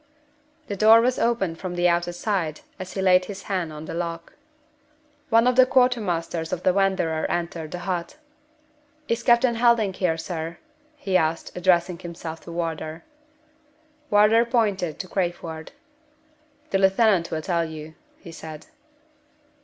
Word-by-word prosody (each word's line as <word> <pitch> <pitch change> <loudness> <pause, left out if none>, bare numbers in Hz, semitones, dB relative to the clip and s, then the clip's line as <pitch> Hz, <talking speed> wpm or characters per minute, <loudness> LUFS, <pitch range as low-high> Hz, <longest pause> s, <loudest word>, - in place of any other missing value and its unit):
The 205 - -4
door 220 +3 +7
was 250 +2 +1
opened 195 -8 0
from 180 -2 -5
the 175 0 +2
outer 175 0 +1
side 175 -4 -2 0.2
as 185 0 -7
he 190 - -2
laid 185 -1 +5
his 195 0 -8
hand 180 -5 -2
on 155 0 -8
the - - -6
lock. 170 0 -5 1.0
One 230 0 +4
of 250 0 +3
the 255 0 +6
quartermasters 205 -11 +1
of 180 - -3
the 185 - +3
Wanderer 190 -5 0
entered 170 -2 -3
the 180 - -5
hut. 180 +4 -3 0.9
"Is 230 +1 -1
Captain 235 +1 +4
Helding 230 -4 +3
here, 180 -3 0
sir?" 165 0 -5 0.4
he 195 -10 -3
asked, 160 -1 -2
addressing 175 -1 +2
himself 170 -2 -7
to 170 - -8
Wardour. 165 -1 -4 1.1
Wardour 210 +3 +5
pointed 205 - 0
to 185 - -6
Crayford. 170 -4 -4 1.0
"The 195 - +2
lieutenant 195 -2 +3
will 155 -1 -3
tell 170 -2 0
you," 155 -1 -8 0.2
he 170 - -12
said. 155 -1 -9
180 Hz, 145 wpm, -24 LUFS, 165-210 Hz, 1.1 s, door